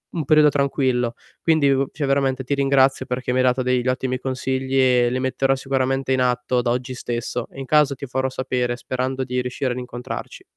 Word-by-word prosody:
un 155 -4 -2
periodo 150 0 +6
tranquillo. 130 -4 0 0.3
Quindi, 155 -4 +3
u 135 0 +1
cioè 145 - -2
veramente 135 -1 +1
ti 140 +3 -1
ringrazio 135 -1 +3
perché 125 0 -3
mi 125 - 0
hai 130 - +3
dato 125 +1 +2
degli 125 0 0
ottimi 130 0 0
consigli 130 0 -2
e 125 -2 +4
li 130 - -1
metterò 135 +1 +1
sicuramente 135 0 -1
in 130 - +1
atto 125 0 +1
da 120 -1 0
oggi 125 +1 -2
stesso. 120 0 -4
E 135 - -11
in 135 - -5
caso 150 0 +3
ti 140 - -7
farò 130 +1 -1
sapere 125 -2 -2
sperando 130 +1 -3
di 125 0 -2
riuscire 125 +1 -2
ad - - -7
incontrarci. 125 0 -7
130 Hz, 205 wpm, -22 LUFS, 125-135 Hz, 0.3 s, periodo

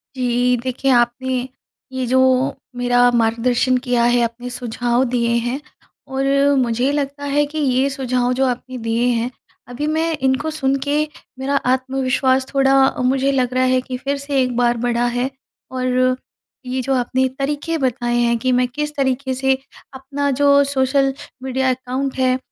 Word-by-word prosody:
जी। 245 -1 +1
देखिए 260 +1 0
आपने 250 +1 +1 0.4
ये 260 -1 -2
जो 260 +1 +3 0.6
मेरा 245 0 +3
मार्गदर्शन 240 +3 +2
किया 245 -1 +2
है 240 0 +3
अपने 240 +2 -4
सुझाव 245 0 -1
दिए 235 -1 +1 0.2
हैं, 265 +4 -2 0.5
और 270 0 -2 0.4
मुझे 245 +3 0
लगता 285 0 -3
है 290 +1 +2
कि 315 - -6
ये 270 -2 +2
सुझाव 255 -2 -1
जो 270 - +4
आपने 255 +1 -3
दिए 230 0 -1
हैं, 235 0 0 0.4
अभी 285 +5 -4
मैं 320 +1 0
इनको 265 +4 0
सुन 275 -3 0
के 295 +1 +1 0.4
मेरा 275 +2 -1 0.2
आत्मविश्वास 260 0 +1
थोड़ा 270 0 +3 0.3
मुझे 270 +2 +2
लग 255 -2 0
रहा 255 0 +2
है 255 - +3
कि 255 0 -6
फिर 280 +2 -2
से 280 -1 -1
एक 250 -1 -1
बार 240 -1 +2
बढ़ा 240 0 0
है। 250 +2 0 0.4
और 255 0 +1 0.5
ये 255 +1 -2
जो 270 +2 -1
आपने 255 +1 +1
तरीके 295 +4 -1
बताए 245 -3 -1
हैं 235 -1 +2
कि 255 +2 0
मैं 250 0 +2
किस 295 +4 -4
तरीके 265 -1 0
से 265 0 +1 0.4
अपना 275 +2 -3
जो 280 0 +6
सोशल 270 +1 +2 0.3
मीडिया 265 0 0
अकाउंट 260 +1 -2
है 255 0 +2
255 Hz, 165 wpm, -19 LUFS, 245-270 Hz, 0.6 s, जो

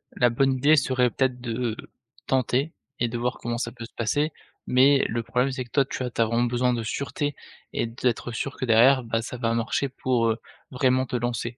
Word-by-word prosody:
la 125 - +4
bonne 135 +3 +2
idée 140 +4 +4
serait 130 -2 +2
peut-être 125 -1 -1
de, 120 -1 -2 0.5
tenter 135 +3 +1 0.3
et 120 - +2
de 120 - -3
voir 125 +2 -2
comment 120 0 -3
ça 120 - -3
peut 120 -2 -9
se 115 - -16
passer, 145 +7 0 0.4
mais 135 +2 +5
le 115 0 -2
problème 125 +4 0
c'est 130 -1 -3
que 120 - -23
toi, 140 -2 +3
tu - - -5
vois? 125 -1 -3
Tu 115 - -1
as - - +5
vraiment 115 +2 +1
besoin 125 +1 +1
de 115 - -3
sûreté 140 +5 -3 0.4
et - - -1
d'être 120 +1 -2
sûr 135 +4 -4
que - - -2
derrière 125 +3 +5
bah, 115 -1 -1
ça 125 - -6
va 115 -1 0
marcher 115 +4 -1
pour, 125 -2 0
heu, 110 - 0 0.3
vraiment 130 0 +2
te - - -4
lancer. 120 0 -2
125 Hz, 225 wpm, -25 LUFS, 115-130 Hz, 0.5 s, mais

